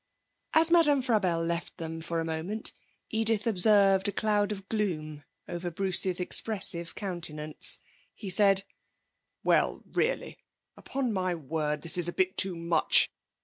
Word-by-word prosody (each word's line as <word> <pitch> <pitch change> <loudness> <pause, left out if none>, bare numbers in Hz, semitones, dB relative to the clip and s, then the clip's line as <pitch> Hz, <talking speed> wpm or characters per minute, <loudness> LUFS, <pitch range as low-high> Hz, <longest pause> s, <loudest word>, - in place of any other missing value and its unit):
As 325 +1 +6
Madame 295 -6 +4
Frabelle 185 -9 0
left 170 0 -4
them 165 0 -6
for 165 0 -3
a 165 - -2
moment, 165 +7 -4 0.4
Edith 225 0 0
observed 200 -2 +4
a - - 0
cloud 210 -1 0
of 195 -2 -7
gloom 155 -9 -3 0.2
over 175 0 -5
Bruce's 185 +1 +2
expressive 180 -3 +1
countenance. 155 -6 -1 0.4
He 200 -3 -4
said: 195 0 +4 0.8
'Well, - - +1
really! - - -2 0.4
Upon 260 -4 -3
my 185 -2 -1
word! 150 -1 -3
This 170 +2 0
is 175 - +1
a 175 - -3
bit 185 +1 0
too 190 -2 +1
much! 170 -1 +3
185 Hz, 140 wpm, -28 LUFS, 165-210 Hz, 0.8 s, As